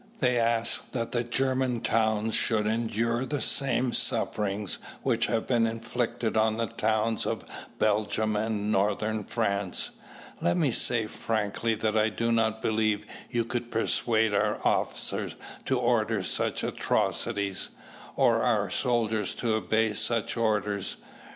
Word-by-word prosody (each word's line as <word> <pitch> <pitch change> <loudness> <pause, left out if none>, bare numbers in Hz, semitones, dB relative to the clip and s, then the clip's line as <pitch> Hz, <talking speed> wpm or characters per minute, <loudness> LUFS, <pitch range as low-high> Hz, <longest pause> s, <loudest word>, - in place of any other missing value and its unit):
They 125 -1 +2
ask 115 0 0
that 120 0 -2
German 130 -1 0
towns 110 -1 +1
should 110 -2 +2
endure 115 +2 0
the 145 +2 -2
same 130 -2 +2
sufferings 100 -1 0 0.2
which 120 -3 +1
have 115 -1 -1
been 115 -3 +2
inflicted 115 0 -2
on 110 0 +2
the 115 - 0
towns 110 0 0
of - - -3 0.3
Belgium 110 0 +1
and 105 -1 -1
Northern 105 +2 0
France. 100 -4 -1 0.5
Let 85 - +1
me 145 -5 +2
say 115 -1 +3
frankly 110 +1 -1
that 110 0 -1
I 110 0 +3
do 115 +2 -1
not 110 -1 +1
believe 110 -1 +1 0.2
you 120 -2 0
could 120 0 -3
persuade 110 -1 +2
our 100 - +1
officers - - 0 0.3
to - - +1
order - - +1
such - - -1
atrocities, 100 -4 -1 0.5
or - - +3
our - - +1
soldiers 110 -4 +1
to 115 -2 -1
obey 110 +1 +1
such 115 +1 +1
orders. 105 -4 0
110 Hz, 130 wpm, -28 LUFS, 105-115 Hz, 0.5 s, say